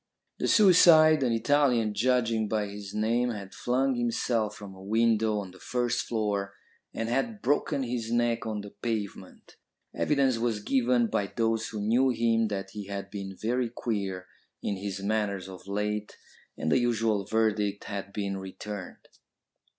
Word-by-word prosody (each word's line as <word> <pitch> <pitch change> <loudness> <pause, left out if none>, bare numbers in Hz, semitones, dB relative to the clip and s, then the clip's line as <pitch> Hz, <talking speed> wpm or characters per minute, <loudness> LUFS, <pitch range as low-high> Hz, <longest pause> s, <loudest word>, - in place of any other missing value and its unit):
The - - 0
suicide, 165 -6 +7
an 125 -3 +2
Italian 120 -2 +2
judging 115 -1 +1
by 105 -1 0
his 100 -1 -8
name, 115 +3 +1
had 100 -4 -6
flung 130 +2 +1
himself 115 -3 0
from 100 -2 -10
a 95 - -13
window 110 +1 +2
on 100 -3 -5
the 95 - -16
first 120 -1 -1
floor, 100 -3 -1 0.4
and 115 - -3
had 135 - -1
broken 140 -1 +1
his 120 -2 -3
neck 120 -1 +1
on 105 -2 -3
the 100 0 -10
pavement. 105 -2 -5 0.4
Evidence 135 -5 +1
was 115 -2 0
given 125 -2 +2
by 100 -3 -1
those 115 +1 0
who 110 - -6
knew 120 +5 +3
him 115 -2 +2
that 95 -2 -4
he 105 -2 -7
had 100 0 -5
been 95 -2 -6
very 120 +2 0
queer 100 -6 -3 0.4
in 100 - -1
his 100 0 -5
manners 100 -3 -1
of 95 0 -11
late, 105 +1 -3 0.4
and 80 - -1
the - - +4
usual 115 -4 +1
verdict 105 -1 0
had 100 0 -5
been 100 -1 -3
returned. 95 0 -8
110 Hz, 160 wpm, -28 LUFS, 100-120 Hz, 0.4 s, suicide